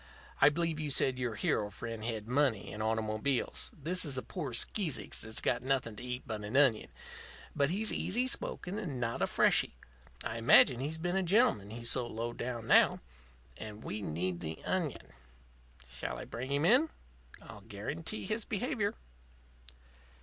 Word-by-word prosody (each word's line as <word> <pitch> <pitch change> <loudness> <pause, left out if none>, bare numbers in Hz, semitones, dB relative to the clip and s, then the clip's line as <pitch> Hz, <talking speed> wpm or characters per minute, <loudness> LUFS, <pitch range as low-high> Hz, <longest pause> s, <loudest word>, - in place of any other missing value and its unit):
I 145 - +9
believe 165 +1 -1
you 155 -1 -2
said 130 -2 +2
your 120 -3 -2
hero 105 0 0
friend 115 0 -6
had 110 -2 -4
money 125 -6 +1
and 105 - -5
automobiles. 110 +4 -1
This 170 +5 -1
is 140 -5 -1
a 130 - -3
poor 155 -9 -5
skeezicks 155 - -1
that's 110 0 -5
got - - +1
nothing 130 -4 -1
to - - -8
eat 125 0 -4
but 110 -2 -5
an 105 +6 -1
onion. 130 -7 +4 0.7
But 140 0 +2
he's 210 +5 +1
easy 240 +7 +1
spoken 200 -5 -1
and 150 - -4
not 115 -1 -2
a - - +3
freshy. - - +3 0.5
I 110 +1 -3
imagine 120 +2 +6
he's 150 +4 -3
been 175 +3 -2
a 190 - +2
gentleman, 180 - +3
he's 115 +1 -2
so 125 -2 0
low 115 +1 -4
down 120 -2 -4
now. - - +5 0.6
And 110 0 -8
we 105 - -4
need 90 0 -2
the 80 -2 -5
onion. 170 - -2 0.7
Shall - - -5
I - - -7
bring 130 +4 -6
him 140 +2 +1
in? 255 - +5 0.5
I'll 110 -2 -12
guarantee 130 - -5
his 220 +1 -1
behavior." 220 -1 -1
125 Hz, 170 wpm, -32 LUFS, 110-165 Hz, 0.7 s, I